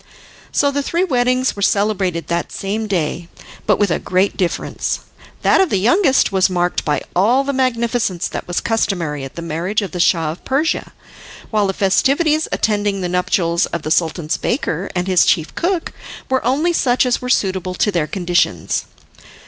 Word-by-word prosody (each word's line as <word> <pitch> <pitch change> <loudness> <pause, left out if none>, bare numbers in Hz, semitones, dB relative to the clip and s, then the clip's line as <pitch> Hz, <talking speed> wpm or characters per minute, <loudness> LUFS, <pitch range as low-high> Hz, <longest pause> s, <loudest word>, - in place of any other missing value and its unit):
So 285 -1 +2
the 285 0 -1
three 335 +5 0
weddings 255 -5 +1
were 200 - -7
celebrated 200 -4 +1
that 170 0 -2
same 215 +3 -3
day, 170 -3 -2 0.4
but - - +4
with 205 -4 +1
a - - +1
great 185 +2 0
difference. 180 -3 -2 0.4
That - - +5
of 380 - +2
the 200 - +1
youngest 265 - +3
was 190 0 +3
marked 175 -1 0
by 150 - -1
all 230 +9 +3
the 280 0 -2
magnificence 235 -7 0
that - - -6
was 175 - -1
customary 175 -10 -1
at 135 - -8
the 170 - -6
marriage 170 +6 -1
of 190 - -5
the 180 - -5
Shah 165 -3 +2
of 165 - -11
Persia, 290 +5 -1 0.6
while 210 -2 +2
the 195 - -1
festivities 290 - +2
attending 205 -2 0
the 180 - -2
nuptials 175 -1 +1
of 170 - -5
the 155 - -3
Sultan's 165 -1 0
baker 195 - -2
and 180 0 0
his 185 -2 +4
chief 160 -1 +1
cook 350 -1 -1 0.4
were 260 - +1
only 290 +9 +1
such 255 -5 +2
as 250 0 0
were 250 - -4
suitable 190 -5 0
to 205 - +1
their 170 -5 0
conditions. 175 - 0
195 Hz, 180 wpm, -18 LUFS, 175-250 Hz, 0.6 s, That